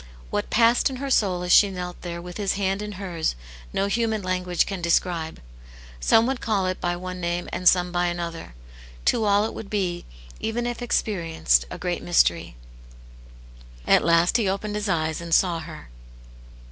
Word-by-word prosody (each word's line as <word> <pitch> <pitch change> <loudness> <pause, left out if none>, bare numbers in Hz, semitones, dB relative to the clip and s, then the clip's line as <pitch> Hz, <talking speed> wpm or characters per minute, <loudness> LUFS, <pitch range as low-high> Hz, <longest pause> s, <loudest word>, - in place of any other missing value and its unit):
What - - -2
passed 235 +3 +4
in 265 - -6
her 275 +1 -4
soul 185 -7 +2
as 180 - -2
she 205 - +7
knelt 180 -2 -6
there 170 -1 -6
with 175 0 -8
his 200 -2 0
hand 195 0 -1
in 210 0 -5
hers, 180 - -3 0.4
no 195 - 0
human 220 0 0
language 180 -1 0
can 195 -3 -5
describe. 170 -1 0 0.6
Some 225 - +4
would 265 0 -2
call 205 -4 0
it 185 0 -3
by 175 0 0
one 185 +1 -6
name 175 +1 -2
and 180 -1 +5
some 180 -1 +1
by 175 0 +1
another; 170 - -5 0.5
to 225 - +2
all 205 +1 +3
it - - -4
would 205 - -8
be, 180 -4 -2 0.3
even 235 +2 -2
if 240 0 -4
experienced, 165 - +1
a - - -7
great - - -3
mystery. - - +2 1.3
At - - +4
last 170 +4 +4
he 215 -5 +1
opened 205 +2 -3
his 210 -1 -2
eyes, 160 -2 -1
and 170 -1 +1
saw 175 -3 +2
her. 160 - -10
185 Hz, 180 wpm, -24 LUFS, 170-210 Hz, 1.3 s, she